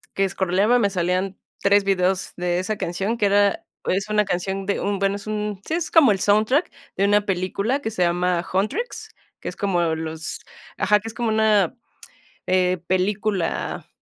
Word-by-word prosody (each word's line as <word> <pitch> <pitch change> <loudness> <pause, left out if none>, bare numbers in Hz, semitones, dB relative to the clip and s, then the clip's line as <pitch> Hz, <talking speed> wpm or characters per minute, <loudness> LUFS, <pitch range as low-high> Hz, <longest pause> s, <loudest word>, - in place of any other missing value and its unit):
que 195 - +1
escroleaba 195 +5 +2
me 205 -3 +2
salían 185 +1 -1 0.2
3 200 0 +4
videos 190 -1 0
de 175 0 -1
esa 185 +4 -2
canción 195 +7 -2
que 205 - +3
era 200 0 +2 0.2
es 195 +2 -1
una 210 0 +2
canción 190 +1 -2
de 200 - -1
un, 200 0 -1
bueno, 195 +1 0
es 205 - -12
un 210 -2 -3
sí, 320 - 0
es 335 -1 -3
como 290 -9 +6
el 195 - +1
soundtrack 215 - +2 0.3
de 195 - +3
una 205 0 +3
película 200 +8 -1
que 220 - -3
se 205 - -3
llama 175 0 +1
Huntrix, 215 - -2 0.3
que - - -8
es - - -9
como 185 -4 0
los 160 0 -5 0.4
Ajá, 210 +1 +3
que 225 - -9
es 225 - -6
como 235 -1 -1
una, 215 -4 +3 0.7
eh, 185 0 +2
película 195 0 -1
200 Hz, 180 wpm, -23 LUFS, 185-210 Hz, 0.7 s, como